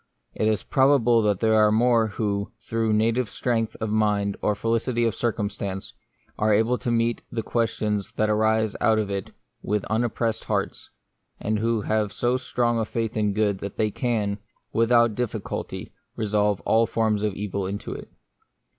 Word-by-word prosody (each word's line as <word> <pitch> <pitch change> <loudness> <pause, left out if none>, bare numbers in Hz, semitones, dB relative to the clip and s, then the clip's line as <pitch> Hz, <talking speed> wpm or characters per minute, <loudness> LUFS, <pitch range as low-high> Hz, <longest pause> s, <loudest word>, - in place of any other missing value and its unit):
It 110 - 0
is 110 -1 +1
probable 130 -4 +4
that 105 -3 +1
there 110 -1 +3
are 105 -1 +5
more 115 0 +3
who, 100 -1 -2
through 115 -1 -1
native 115 +2 +2
strength 115 -2 -1
of 110 -1 -2
mind, 105 -2 +1
or 105 - +1
felicity 115 +2 0
of 115 - +1
circumstance, 100 -4 -3 0.5
are 105 0 +3
able 115 +4 +2
to - - -3
meet 115 0 +1
the 115 - -2
questions 105 -3 -1
that 110 - +1
arise 110 0 +2
out 110 -1 +4
of 105 -2 -1
it 100 -1 -3 0.3
with 105 -1 -1
unoppressed 115 0 0
hearts, - - -2 0.5
and 105 0 -1
who 115 0 +1
have 105 -1 0
so 120 +4 0
strong 120 -2 0
a 110 - 0
faith 115 0 -3
in 105 -2 +1
good 105 -2 +1
that 100 0 -6
they 110 -1 +1
can, 105 -5 -1 0.3
without 115 0 +4
difficulty, 120 0 -4 0.2
resolve 105 -2 +1
all 115 +1 +3
forms 110 -2 +1
of 105 -2 -1
evil 100 -2 -3
into 100 +1 -5
it. - - -8
110 Hz, 165 wpm, -25 LUFS, 105-115 Hz, 0.5 s, are